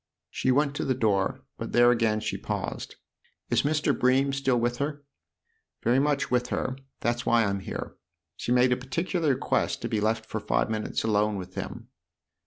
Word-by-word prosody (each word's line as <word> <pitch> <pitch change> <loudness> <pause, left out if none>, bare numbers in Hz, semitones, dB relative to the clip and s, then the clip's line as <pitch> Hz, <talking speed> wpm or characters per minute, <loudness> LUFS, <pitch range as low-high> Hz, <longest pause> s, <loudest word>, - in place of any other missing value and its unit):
She - - -1
went 140 +2 +3
to - - -1
the 130 - +1
door, 105 -6 +1 0.2
but - - -5
there 120 0 +6
again 110 -2 +1
she - - -2
paused. - - -4 0.3
" - - -40
Is - - +4
Mr. 150 +1 +1
Bream 135 +2 +3
still 135 -3 +1
with 120 +1 0
her? 145 +1 -3 0.3
" 465 - -49
" 445 - -44
Very 120 +3 +4
much 145 -1 +1
with 125 0 +2
her 130 - -2 0.3
that's 120 +1 0
why 115 -1 +3
I'm 100 -1 -1
here. 95 - -6 0.4
She - - -4
made 125 0 +4
a 125 - +3
particular 165 +5 -1
request 130 - -1
to - - 0
be 110 - -1
left 110 +1 0
for 110 - -4
five 105 +1 0
minutes 110 -1 -2
alone 105 -1 +2
with 95 -1 -7
him." - - -6
120 Hz, 195 wpm, -27 LUFS, 110-135 Hz, 0.4 s, there